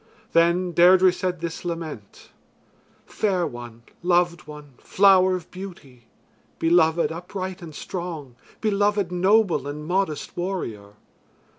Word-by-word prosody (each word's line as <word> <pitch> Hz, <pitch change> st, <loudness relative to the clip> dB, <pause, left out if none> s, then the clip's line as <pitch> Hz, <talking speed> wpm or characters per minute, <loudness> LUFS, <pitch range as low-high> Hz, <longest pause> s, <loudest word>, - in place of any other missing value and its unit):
Then 170 Hz, +2 st, +3 dB
Deirdre 180 Hz, +2 st, +6 dB
said 180 Hz, -2 st, -3 dB
this 170 Hz, -1 st, -5 dB
lament: 165 Hz, -, -7 dB, 0.7 s
"Fair 190 Hz, -5 st, 0 dB
one, 120 Hz, -3 st, -9 dB, 0.2 s
loved 175 Hz, -1 st, +1 dB
one, 150 Hz, -2 st, -11 dB
flower 190 Hz, -1 st, +4 dB
of 175 Hz, -3 st, -8 dB
beauty; 150 Hz, -11 st, -11 dB, 0.5 s
beloved 165 Hz, 0 st, +3 dB
upright 185 Hz, +2 st, -6 dB
and 160 Hz, -3 st, -10 dB
strong; 165 Hz, -9 st, -6 dB, 0.3 s
beloved 205 Hz, -3 st, +1 dB
noble 185 Hz, -5 st, +2 dB
and 150 Hz, +1 st, -6 dB
modest 175 Hz, -3 st, -2 dB
warrior. 115 Hz, -, -4 dB
175 Hz, 110 wpm, -24 LUFS, 155-185 Hz, 0.7 s, Deirdre